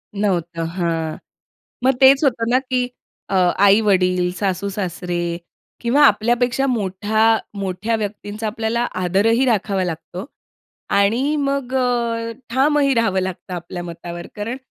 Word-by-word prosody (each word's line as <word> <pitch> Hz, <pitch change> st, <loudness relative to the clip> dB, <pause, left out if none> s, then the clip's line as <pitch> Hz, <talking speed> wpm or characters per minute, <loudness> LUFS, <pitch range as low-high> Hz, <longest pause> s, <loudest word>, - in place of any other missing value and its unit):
नव्हतं, 175 Hz, -5 st, -1 dB
हां. 165 Hz, -2 st, -2 dB, 0.7 s
मग 265 Hz, -, +4 dB
तेच 270 Hz, +1 st, +7 dB
होतं 235 Hz, -3 st, +1 dB
ना 255 Hz, -, +4 dB
की 250 Hz, -1 st, +1 dB, 0.4 s
अ, 195 Hz, -, -1 dB, 0.3 s
आई-वडील 185 Hz, -3 st, +3 dB
सासू-सासरे 185 Hz, -3 st, -2 dB, 0.6 s
किंवा 250 Hz, +5 st, +3 dB
आपल्यापेक्षा 240 Hz, +4 st, +2 dB
मोठा 210 Hz, -3 st, -1 dB, 0.4 s
मोठ्या 195 Hz, +3 st, -2 dB
व्यक्तींचा 210 Hz, +1 st, -5 dB
आपल्याला 225 Hz, +2 st, -1 dB, 0.2 s
आदरही 210 Hz, +8 st, +2 dB
राखावा 200 Hz, -4 st, +1 dB
लागतो 175 Hz, +3 st, -5 dB, 0.7 s
आणि 235 Hz, +9 st, +2 dB
मग 275 Hz, -2 st, -2 dB
अ, 235 Hz, -2 st, 0 dB, 0.2 s
ठामही 275 Hz, +2 st, +3 dB
राहावं 225 Hz, -5 st, +2 dB
लागतं 185 Hz, 0 st, -5 dB
आपल्या 175 Hz, 0 st, -6 dB
मतावर 170 Hz, 0 st, -7 dB
कारण 225 Hz, +5 st, -3 dB
210 Hz, 115 wpm, -20 LUFS, 185-240 Hz, 0.7 s, तेच